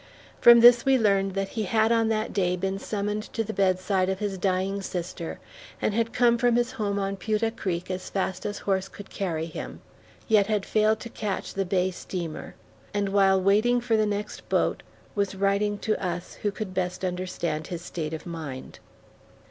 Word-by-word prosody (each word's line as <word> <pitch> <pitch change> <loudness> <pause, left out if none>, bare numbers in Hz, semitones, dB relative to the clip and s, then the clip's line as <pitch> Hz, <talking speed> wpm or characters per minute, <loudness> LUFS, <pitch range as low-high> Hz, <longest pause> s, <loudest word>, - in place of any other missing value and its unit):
From 235 0 +8
this 240 0 +8
we 270 -1 +4
learned 195 -4 +2
that 195 0 -1
he 220 - -3
had 220 +2 +2
on 230 -1 +3
that 220 -1 -1
day 180 -3 +1
been 190 +2 -2
summoned 210 0 -2
to 225 - 0
the 220 0 -5
bedside 185 -1 +1
of 190 - -1
his 200 -2 -3
dying 190 +1 0
sister, 175 -2 -5 0.4
and - - 0
had 230 +1 0
come 235 -1 +3
from 245 -1 +3
his 240 0 +1
home 200 -2 -2
on 195 0 -2
Putah 220 +3 -1
Creek 185 -3 -3
as 185 0 -5
fast 190 -1 -2
as 205 0 -3
horse 195 -1 -1
could 205 +1 -12
carry 165 -5 -2
him, 165 - -7 0.5
yet 210 -3 +4
had 210 -2 0
failed 215 0 +2
to 235 - -7
catch 210 -4 -4
the 195 0 -1
bay 185 0 +1
steamer; 175 -3 -6 0.4
and 200 -1 +1
while 195 -1 +4
waiting 215 +6 +3
for 240 -1 +1
the 215 -1 +2
next 205 0 -4
boat, - - +1 0.3
was 200 -1 -1
writing 200 +1 +1
to 215 0 -2
us 175 -1 -3
who 210 - +1
could 200 -1 -6
best 185 0 -2
understand 180 -4 -3
his 175 -1 -6
state 160 -3 -4
of 160 - -9
mind. 155 -7 -7
195 Hz, 190 wpm, -26 LUFS, 185-215 Hz, 0.5 s, From